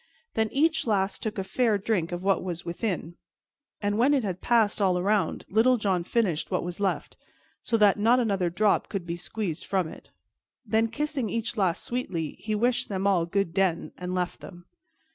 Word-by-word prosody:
Then 220 -1 +1
each 315 0 +2
lass 200 -2 +1
took 220 -1 -4
a 195 - -1
fair 225 +2 +1
drink 195 -5 -1
of 175 +1 -4
what 195 0 +2
was 175 -2 -5
within, 175 -1 -3 0.7
and 205 +1 0
when 275 +5 +4
it 265 - +1
had 185 -3 -3
passed 225 -3 +2
all 185 -2 +3
around, 200 +3 0
Little 240 +5 +4
John 190 -5 0
finished 185 -5 0
what - - 0
was 175 +1 -6
left, 200 -1 -2 0.4
so 230 - 0
that 210 -1 +4
not 235 +4 +4
another 195 -7 +1
drop 205 +4 +1
could 195 -4 -4
be 170 0 -3
squeezed 175 -1 -3
from 190 -3 +1
it. - - -12 0.6
Then, 220 +1 +2
kissing 275 0 -2
each 230 +4 -2
lass 190 -6 +1
sweetly, 185 - -3
he 215 -1 -2
wished 240 +3 +1
them 195 -1 -2
all 180 -4 +3
good 195 -2 0
den, 185 -3 0
and 180 0 -4
left 180 -1 -2
them. 175 -1 -12
200 Hz, 190 wpm, -27 LUFS, 180-225 Hz, 0.7 s, when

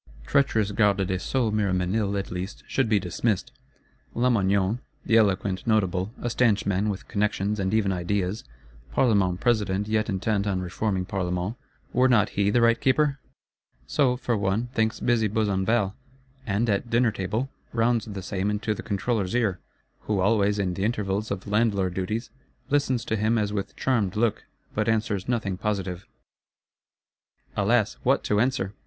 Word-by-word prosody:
Treacherous 110 - +2
Garde 100 -2 +2
des 95 0 -1
Sceaux 125 -5 0
Miroménil, 100 0 0
at 100 - -4
least, 90 +3 -5
should 135 -4 0
be 105 -2 +4
dismissed; 95 +3 -1 0.6
Lamoignon, 100 -3 +2 0.3
the 115 - +2
eloquent 100 -3 +2
Notable, 95 -3 +1
a - - -3
stanch 115 -4 +2
man, 100 +2 +1
with 100 -1 -5
connections, 105 0 0
and 95 -1 0
even 105 -3 +2
ideas, 95 +2 -1 0.5
Parlement 100 -8 +2
President 105 -4 +1
yet 110 0 0
intent 100 +1 0
on 95 -2 0
reforming 90 +1 -2
Parlements, 90 +2 -2 0.4
were 130 +1 +4
not 115 -5 +4
he 100 0 +1
the 120 +3 +3
right 115 0 +4
Keeper? 140 +1 +2 0.7
So, 125 - +2
for 120 -1 -1
one, 105 +4 0
thinks 110 -3 0
busy 115 -3 +2
Besenval; 100 -1 +1 0.5
and, 105 +3 +1
at 105 +2 0
dinner 115 0 +3
table, 110 +7 -3 0.2
rounds 115 -1 +1
the 100 -3 -6
same 95 +2 -2
into 105 +1 -1
the - - -6
Controller's 100 -1 -1
ear,—who 105 -1 -3
always, 100 +1 +2
in 95 -3 0
the 95 - -3
intervals 105 -1 -1
of 95 -2 -4
landlord 100 -3 +1
duties, 105 +6 -3 0.4
listens 130 -5 +1
to 110 - -1
him 110 +2 +1
as 105 -1 0
with 100 -2 -4
charmed 110 -7 0
look, 110 0 0 0.3
but 105 +1 0
answers 110 -3 0
nothing 110 -6 -1
positive. 95 -3 -3 1.5
Alas, 105 +1 +2
what 135 +3 +2
to 105 - +1
answer? 120 -5 0
105 Hz, 155 wpm, -26 LUFS, 95-115 Hz, 1.5 s, be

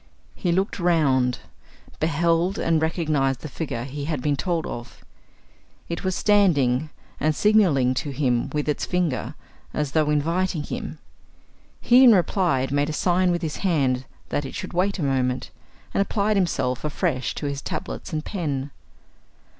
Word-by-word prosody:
He 175 - -1
looked 190 +4 0
round, 140 -8 +2 0.6
beheld 165 +4 +1
and 165 -1 +1
recognized 155 -5 0
the - - -6
figure 135 -6 -4
he 140 +2 -5
had 155 -2 -2
been 145 +2 0
told 170 +2 -1
of. 120 0 -8 0.8
It 170 +2 -4
was 185 -1 0
standing 155 -10 +3 0.3
and 155 0 +1
signalling 175 -13 +4
to 145 - -6
him 130 -4 0
with 150 0 -2
its 150 - -1
finger, 155 -6 -1 0.4
as 150 -2 -1
though 155 -1 +2
inviting 165 +2 0
him. - - -5 0.8
He, 250 +2 +6
in 240 -4 +8
reply, 175 -7 +1
made 145 +1 +1
a - - -3
sign 180 +3 +2
with 175 0 0
his 155 -2 -3
hand 135 -8 +1 0.2
that 145 - -1
it 135 - -7
should - - -6
wait 190 +4 +1
a 170 - -2
moment, 130 -2 0 0.4
and - - +2
applied 205 +1 +1
himself 135 -9 0
afresh 150 -3 -1
to - - -5
his 140 -1 -3
tablets - - -5
and 155 -1 -3
pen. 145 -7 -3
155 Hz, 155 wpm, -24 LUFS, 135-180 Hz, 0.8 s, in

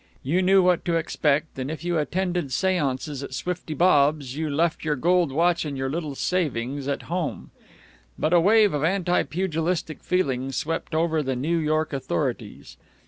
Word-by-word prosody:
You 165 +8 +1
knew 190 +1 +5
what 180 -1 +2
to 170 -2 +1
export, 150 -2 +1
and 130 +1 -3
if 160 +1 -6
you 175 -2 0
attended 175 -1 -1
seances 145 -4 -1
at 135 -2 -6
Swifty 175 0 -4
Bob's 145 -5 +3
you 155 0 -2
left 160 +3 0
your 155 -2 0
gold 175 +2 +2
watch 170 +4 +2
and 145 -3 -4
your 135 0 -2
little 155 -3 -4
savings 140 -6 -2
at 140 - -2
home. 170 -2 -4 0.7
But 160 - 0
a 175 - +7
wave 210 +1 +5
of 145 0 -1
anti 180 +1 +2
pugilistic 165 -2 -2
feeling 135 -8 -1
swept 160 +3 -3
over 160 -1 +1
the 135 -2 -2
New 160 +7 0
York 155 0 0
authorities. 130 -11 -3
160 Hz, 170 wpm, -24 LUFS, 140-175 Hz, 0.7 s, a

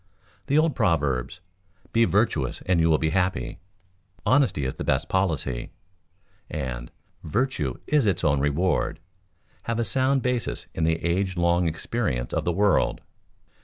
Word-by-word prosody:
The 145 +1 +2
old 155 -1 +3
proverbs, 75 - 0 0.5
"Be 115 0 +5
virtuous 95 - 0
and 90 -2 +2
you 80 0 +3
will 80 - +5
be 80 0 0
happy," 90 -5 -1 0.7
"Honesty 125 - +3
is 65 - -2
the - - -6
best - - 0
policy," 80 -10 -1 0.8
and - - -4 0.3
"Virtue 85 - -1
is 145 -7 +2
its 95 -4 0
own 75 -3 +3
reward," 75 +5 0 0.7
have 115 0 0
a 115 - +1
sound 130 +2 +2
basis 125 -2 -1
in 80 - 0
the 80 0 0
age 95 +2 0
long 85 0 +2
experience 80 - -2
of - - -1
the 85 - +2
world. 100 +2 +2
90 Hz, 145 wpm, -25 LUFS, 75-115 Hz, 0.8 s, Be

